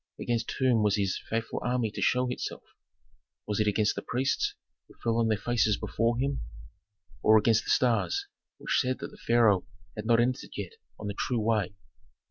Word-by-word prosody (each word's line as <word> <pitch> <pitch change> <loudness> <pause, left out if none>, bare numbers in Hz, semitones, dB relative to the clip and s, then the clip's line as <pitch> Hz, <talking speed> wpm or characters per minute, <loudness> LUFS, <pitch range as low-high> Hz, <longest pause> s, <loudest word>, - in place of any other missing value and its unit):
Against 115 -1 -1
whom 125 -4 +3
was 105 -1 +3
his 100 -3 0
faithful 115 +1 -2
army 120 -3 0
to - - -6
show 125 0 +2
itself? 125 - -5 0.8
Was 105 0 -2
it 105 - +2
against 105 0 +2
the - - -5
priests 130 +3 -1 0.3
who - - -18
fell 115 -1 +1
on 115 -1 +2
their 110 -1 +2
faces 110 -1 +1
before 115 +1 0
him? 135 +2 -1 0.8
Or 110 0 +6
against 110 +1 +3
the - - -6
stars 130 - +2 0.3
which - - 0
said 130 0 0
that - - -7
the - - -15
pharaoh 115 -5 +3 0.3
had 105 0 -5
not 115 0 +5
entered 125 +3 -1
yet - - -4 0.3
on 105 - -7
the 100 - -2
true 120 +4 -1
way? 105 -4 0
115 Hz, 185 wpm, -29 LUFS, 105-125 Hz, 0.8 s, Or